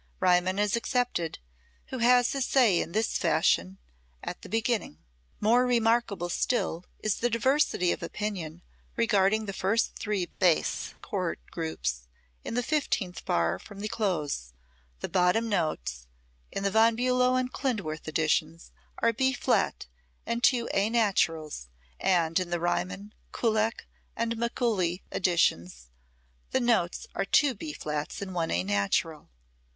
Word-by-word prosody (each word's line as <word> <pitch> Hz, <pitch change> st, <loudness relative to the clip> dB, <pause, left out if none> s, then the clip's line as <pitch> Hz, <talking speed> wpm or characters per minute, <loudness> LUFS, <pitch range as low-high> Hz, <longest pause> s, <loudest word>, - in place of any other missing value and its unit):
Riemann 185 Hz, +1 st, +3 dB
is 210 Hz, +2 st, +2 dB
excepted, 235 Hz, -, -1 dB, 0.5 s
who 260 Hz, -, -4 dB
has 245 Hz, +1 st, +4 dB
his 270 Hz, -2 st, -1 dB
say 235 Hz, -10 st, +4 dB
in 165 Hz, -, -5 dB
this 220 Hz, +4 st, 0 dB
fashion, 90 Hz, +3 st, +2 dB, 0.5 s
at -, -, -6 dB
the -, -, -11 dB
beginning: 225 Hz, -, -1 dB
[Musical -, -, -37 dB
score -, -, -39 dB
excerpt] 80 Hz, -, -16 dB
More 240 Hz, +4 st, +4 dB
remarkable 230 Hz, -6 st, +1 dB
still 180 Hz, -3 st, -1 dB, 0.2 s
is 215 Hz, -2 st, +1 dB
the 240 Hz, -, +1 dB
diversity 230 Hz, -6 st, +2 dB
of -, -, -3 dB
opinion 180 Hz, -6 st, -4 dB, 0.3 s
regarding 215 Hz, -1 st, +2 dB
the 195 Hz, -, -4 dB
first 200 Hz, +5 st, 0 dB
three 205 Hz, -4 st, -1 dB
bass 175 Hz, -2 st, 0 dB
chord -, -, -2 dB
groups 60 Hz, -6 st, -3 dB, 0.4 s
in -, -, -5 dB
the 245 Hz, -, +1 dB
fifteenth 230 Hz, -, -1 dB
bar 85 Hz, 0 st, +1 dB
from 200 Hz, -, -12 dB
the 210 Hz, -, -2 dB
close: 155 Hz, -, -2 dB, 0.5 s
the -, -, -2 dB
bottom 185 Hz, +5 st, +2 dB
notes 110 Hz, -, -2 dB, 0.4 s
in 195 Hz, -, -3 dB
the 200 Hz, -, +1 dB
Von 225 Hz, +2 st, +5 dB
Bulow 250 Hz, +1 st, +2 dB
and 255 Hz, 0 st, -1 dB
Klindworth 205 Hz, -, -3 dB
editions 155 Hz, +1 st, 0 dB, 0.3 s
are 230 Hz, 0 st, +2 dB
B 260 Hz, +3 st, +1 dB
flat -, -, 0 dB, 0.4 s
and 235 Hz, +1 st, -2 dB
two 240 Hz, -3 st, +4 dB
A 200 Hz, +2 st, +2 dB
naturals, 165 Hz, -, 0 dB, 0.3 s
and 170 Hz, -2 st, +2 dB
in 185 Hz, -1 st, -3 dB
the 175 Hz, 0 st, -1 dB
Riemann, 185 Hz, +4 st, -2 dB, 0.2 s
Kullak 220 Hz, -1 st, 0 dB, 0.3 s
and 230 Hz, 0 st, -1 dB
Mikuli 225 Hz, -6 st, 0 dB
editions 90 Hz, -, 0 dB, 0.6 s
the -, -, +1 dB
notes 235 Hz, -8 st, +1 dB
are -, -, -1 dB
two 275 Hz, +7 st, +3 dB
B 300 Hz, +8 st, -6 dB
flats 150 Hz, -, -4 dB
and 195 Hz, -2 st, -5 dB
one 170 Hz, -2 st, -1 dB
A 85 Hz, +1 st, 0 dB
natural. 100 Hz, -, -1 dB
195 Hz, 145 wpm, -28 LUFS, 165-230 Hz, 0.6 s, Von